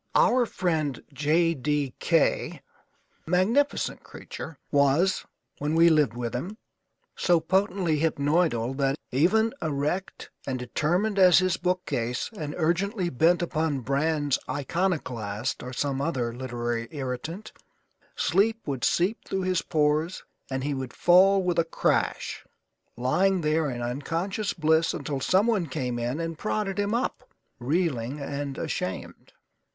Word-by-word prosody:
Our 245 0 +4
friend 155 - -1
J 160 +4 +2
D 145 -2 -1
K, 165 -3 +1 0.6
magnificent 215 - +1
creature, 160 - -9
was 145 +6 +2 0.3
(when 150 +2 -1
we 165 +1 +6
lived 150 -8 +3
with 120 -1 -3
him) 180 - -4 0.6
so 175 -2 +3
potently 180 -2 +1
hypnoidal 145 -5 +1
that, 135 -1 +1 0.2
even 220 - +3
erect 155 +4 -3 0.2
and 130 -2 -1
determined 175 - 0
as 180 -2 +7
his 185 -1 +2
bookcase 175 - -2
and 150 -6 -5
urgently 180 +3 0
bent 170 +7 +3
upon 155 -4 -1
Brann's 145 +1 0
Iconoclast 130 - -2
or 125 - -7
some 135 +1 -2
other 130 -6 -1
literary 120 -2 -3
irritant, 150 - -5 0.6
sleep 225 +3 +2
would 135 -4 -3
seep 185 +6 +2
through 190 -1 -2
his 185 -1 +1
pores 155 +2 0 0.3
and 130 -1 -2
he 145 +1 -1
would 130 -2 -5
fall 190 +2 +5
with 175 -2 +1
a - - +4
crash, 165 - -1 0.5
lying 180 +10 +2
there 155 0 +1
in 120 -2 -4
unconscious 165 - -2
bliss 160 0 +2
until 140 -2 -3
someone 190 - +2
came 125 -4 -3
in 120 +6 -2
and 165 -1 -4
prodded 210 -2 -2
him 205 +2 0
up, 255 +1 -3 0.3
reeling 140 -2 -1
and 140 0 -4
ashamed. - - -5
155 Hz, 130 wpm, -26 LUFS, 135-180 Hz, 0.6 s, as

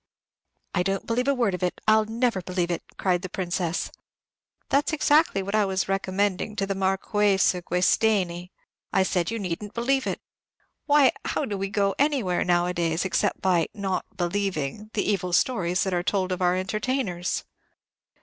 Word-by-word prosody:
"I 180 - +1
don't 195 +1 -1
believe 245 +3 0
a 280 - +4
word 235 -6 +1
of 180 - -4
it, 180 -1 -1
I'll 215 0 +5
never 230 -2 0
believe 180 -1 -2
it," 170 - -2 0.2
cried 180 -2 +1
the 185 - -6
Princess. 175 -2 -2 0.8
"That's 290 +3 +2
exactly 295 -9 +3
what 200 +2 -5
I 215 -1 +4
was 190 0 -1
recommending 195 +1 -1
to 195 - -1
the 195 - -2
Mar 190 0 +1
quesa 195 -3 +2
Guesteni. 180 0 +1 0.4
I 190 - +3
said, 180 -2 0
you 230 - -2
need 180 -4 -3
n't 205 - -9
believe 265 +3 +1
it. - - -2 0.7
Why, 290 -3 +6
how 295 - -1
do 210 - -3
we 195 0 -3
go 200 -1 +1
anywhere, 265 -11 +1
nowadays, 175 -1 +1
except 190 - 0
by 180 -4 +2
'not 195 -2 -3
believing' 190 0 -2
the 205 - 0
evil 185 -3 -1
stories 180 -6 +2
that 190 - -2
are 175 - +1
told 185 0 0
of 185 - -2
our 180 0 +3
entertainers." 195 -1 -2
195 Hz, 170 wpm, -25 LUFS, 180-215 Hz, 0.8 s, Why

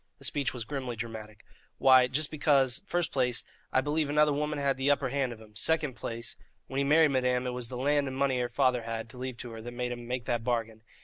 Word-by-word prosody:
The - - -8
speech 140 -2 0
was 125 -3 -5
grimly 130 -1 -4
dramatic. 110 -2 -7 0.3
"Why, 130 -1 +6
just 145 +4 0
because, 140 -4 +3
first 175 -1 0
place, 125 -3 0 0.3
I 130 - +3
believe 150 +1 0
another 150 0 +4
woman 150 +1 -1
had 140 -1 +1
the 135 +2 0
upper 140 -2 +2
hand 135 -1 0
of 115 - -9
him; 110 -1 -16
second 155 +4 +1
place, 115 -2 -6 0.3
when 135 +1 -3
he - - +2
married 150 +2 +5
madame 125 -1 +1
it 125 - -1
was 125 -2 -4
the 125 - -5
land 145 +2 +2
and 130 0 -5
money 135 -2 +1
her 120 -1 -1
father 125 -1 +2
had 115 0 -5
to 125 - -12
leave 130 -2 -5
her 115 -2 -8
that 120 +2 -7
made 125 0 -3
him 120 -1 -6
make 125 -1 -3
that 120 0 -1
bargain. 115 -2 -2
130 Hz, 240 wpm, -29 LUFS, 120-140 Hz, 0.3 s, Why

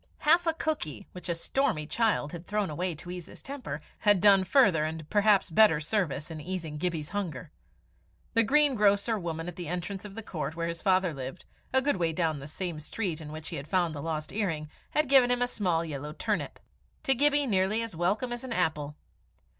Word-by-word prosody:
Half 335 +3 +4
a 330 - +3
cookie, 155 - -3
which 180 0 -9
a 170 - +1
stormy 165 - 0
child 215 -5 +1
had 170 0 -8
thrown 205 -4 -1
away 175 +3 -2
to 175 +4 -9
ease 180 -2 -6
his - - -12
temper, 255 - -6 0.2
had 205 -3 +4
done 195 0 +6
further 190 - +4
and 160 0 -4
perhaps 205 -3 +4
better 185 -3 +6
service 155 -3 -2
in 155 -1 -6
easing 165 -3 -5
Gibbie's 165 -3 -2
hunger. 180 -6 -4 0.8
The 230 - +6
green 290 +5 +4
grocer 210 0 +3
woman 165 -2 -4
at 180 - -7
the 175 - -5
entrance 180 +3 -4
of 205 -2 -9
the 225 - -6
court 155 -6 -4
where 170 0 -2
his 170 0 -5
father 185 -4 +2
lived, 135 +4 -7 0.3
a 265 0 +3
good 285 -6 +1
way 165 -2 0
down 160 -3 0
the 140 - -8
same 170 0 -4
street 170 +1 -3
in 150 -1 -8
which 155 0 -7
he - - -5
had 140 +1 -7
found 175 -3 +1
the 145 - -5
lost 155 -1 -4
earring, 165 -8 -2 0.2
had 300 -1 +1
given 265 -2 +6
him 245 0 +2
a - - +1
small 180 -8 0
yellow 150 -1 -5
turnip - - -2 0.5
to 270 - +4
Gibbie 290 +2 +3
nearly 210 0 +1
as 225 -6 -6
welcome 200 +9 0
as 240 - -6
an 255 -3 -4
apple. 150 -5 -1
180 Hz, 210 wpm, -29 LUFS, 155-220 Hz, 0.8 s, done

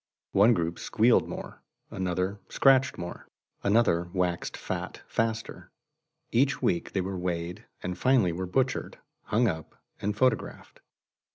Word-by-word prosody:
One 110 +4 +5
group 85 -1 -2
squealed 115 +2 +3
more; - - -7 0.3
another 95 +2 -2
scratched 135 -1 +4
more; 85 -1 -7 0.3
another 100 -5 +2
waxed 90 -2 -1
fat - - -5
faster. 115 0 -2 0.6
Every 135 +3 +3
week 175 -3 0
they 95 - +1
were 95 0 -4
weighed, 90 -1 -3 0.2
and 90 0 -3
finally 125 -6 +3
were 90 +2 -4
butchered, 130 +7 -1 0.3
hung 115 +3 +2
up, 80 -6 -4 0.3
and 105 +1 -1
photographed. 130 0 0
100 Hz, 125 wpm, -28 LUFS, 90-120 Hz, 0.6 s, One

